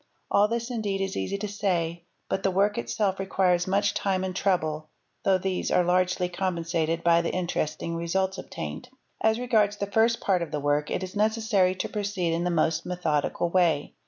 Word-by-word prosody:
All 205 +1 +5
this 235 +2 -3
indeed 210 -5 -2
is 195 0 -2
easy 200 - -2
to 210 +1 -4
say, 175 -5 -1 0.2
but 190 - -1
the 195 - +2
work 200 +3 +2
itself 190 - -1
requires 185 -2 +1
much 200 +2 +2
time 190 -2 0
and 185 -1 -3
trouble, 155 -6 0 0.3
though 190 -1 +4
these 185 0 -2
are 180 - +3
largely 180 0 +1
compensated 170 -2 -1
by 170 0 +5
the 170 - -2
interesting 170 -2 -2
results 190 +3 -1
obtained. 250 - -7 0.3
As 220 0 +3
regards 215 -4 +2
the 200 - -1
first 225 +2 +3
part 185 -3 +1
of 170 - -3
the 150 - -3
work 145 +1 0
it - - -2
is 185 +1 -7
necessary 210 -3 +2
to - - -3
proceed 200 -5 -2
in 170 +1 -1
the - - +1
most 160 -1 +1
methodical 170 -1 -1
way. 170 -5 +2
185 Hz, 190 wpm, -26 LUFS, 170-200 Hz, 0.3 s, All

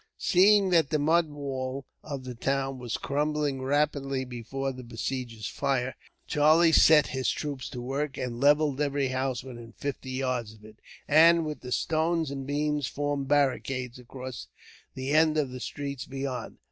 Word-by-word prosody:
Seeing 195 +1 +4
that 165 -5 +4
the 155 - +1
mud 160 +2 +2
wall 135 -2 -4 0.2
of 140 -3 -6
the 130 -1 -6
town 135 +2 -1
was 120 -2 -3
crumbling 145 -1 -1
rapidly 140 -1 0
before 130 +3 -4
the 130 -1 -9
besiegers' 115 -2 -4
fire, 130 -2 -1 0.3
Charlie 155 +3 +4
set 155 -2 +7
his 130 0 -1
troops 145 -4 -4
to 125 -3 -6
work, 140 +3 -3
and 120 -2 -4
levelled 145 0 +3
every 140 -2 0
house 130 -2 -2
within 120 -3 -10
fifty 140 -2 -5
yards 130 -4 -2
of 105 -1 -17
it, 110 0 -15 0.3
and 165 +2 +6
with 150 -1 -4
the 125 - -8
stones 160 +1 0
and 135 -1 -5
beams 145 -1 0
formed 145 -1 -2
barricades 130 -3 0
across 130 0 -8 0.5
the 130 +1 -3
end 155 0 +4
of 140 -4 0
the 130 - -7
streets 140 0 -5
beyond. 135 -3 -5
135 Hz, 160 wpm, -28 LUFS, 130-150 Hz, 0.5 s, set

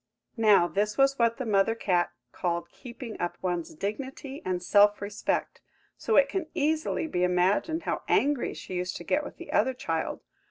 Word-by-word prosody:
Now 210 -6 +5
this 205 +3 -1
was 275 0 +3
what 230 -1 +3
the 260 - -3
mother 210 +1 +2
cat 180 -6 +1 0.2
called 170 -1 -2
keeping 235 -2 -9
up 175 - -2
one's 175 -3 -3
dignity 265 - -5
and 180 -1 -2
self 205 +2 +5
respect, 205 +1 -2 0.3
so 450 - -1
it 280 - +6
can 325 +3 -3
easily 310 +2 0
be 180 - -1
imagined 185 - +1
how - - -2
angry 285 -2 +1
she - - -8
used 180 0 -2
to - - -9
get 295 +11 +1
with - - -9
the 345 - -9
other 255 +4 +2
child. 165 -8 -3
210 Hz, 175 wpm, -28 LUFS, 180-275 Hz, 0.3 s, it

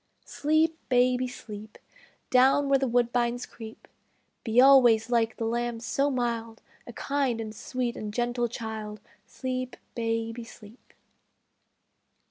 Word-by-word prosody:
Sleep, 315 +2 +1
baby, 250 0 +3
sleep, 215 -3 -10 0.5
Down 270 +2 +4
where 275 -1 +4
the 270 - 0
woodbines 240 0 0
creep; 225 -1 -12 0.6
Be 225 +1 +2
always 245 -4 +6
like 230 -2 +1
the 225 - -2
lamb 235 0 -2
so 275 +4 0
mild, 235 -3 -3 0.2
A 240 - -8
kind 275 -3 -1
and 215 -1 -6
sweet 245 +1 -3
and 210 -1 -5
gentle 240 +1 -1
child, 220 -2 -6 0.3
Sleep, 255 -1 -4 0.2
baby, 230 0 -2
sleep! 225 0 -16
240 Hz, 120 wpm, -27 LUFS, 225-255 Hz, 0.6 s, always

